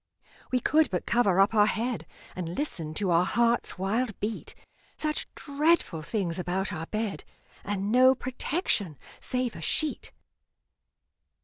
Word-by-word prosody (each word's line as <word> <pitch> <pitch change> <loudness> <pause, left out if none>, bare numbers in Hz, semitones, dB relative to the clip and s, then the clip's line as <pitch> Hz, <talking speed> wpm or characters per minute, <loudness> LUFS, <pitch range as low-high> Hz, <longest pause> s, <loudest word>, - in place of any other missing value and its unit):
We 255 - +3
could 310 +4 +3
but 180 -2 -2
cover 205 -6 +3
up 195 +3 +5
our 210 -1 +5
head, 235 +2 -2 0.3
And 175 -1 -4
listen 165 - -3
to 195 -1 0
our 170 +1 +5
heart's 235 +2 +1
wild 215 +4 -1
beat 215 +1 -4 0.4
Such 305 -1 -1
dreadful 290 - +1
things 175 0 -2
about 190 +3 -1
our 165 -1 -5
bed, 215 -2 -3 0.4
And 205 0 -2
no 255 +2 +6
protection 250 - -1 0.2
save 250 -2 -2
a - - -8
sheet! 300 - -1
215 Hz, 135 wpm, -28 LUFS, 185-255 Hz, 0.4 s, no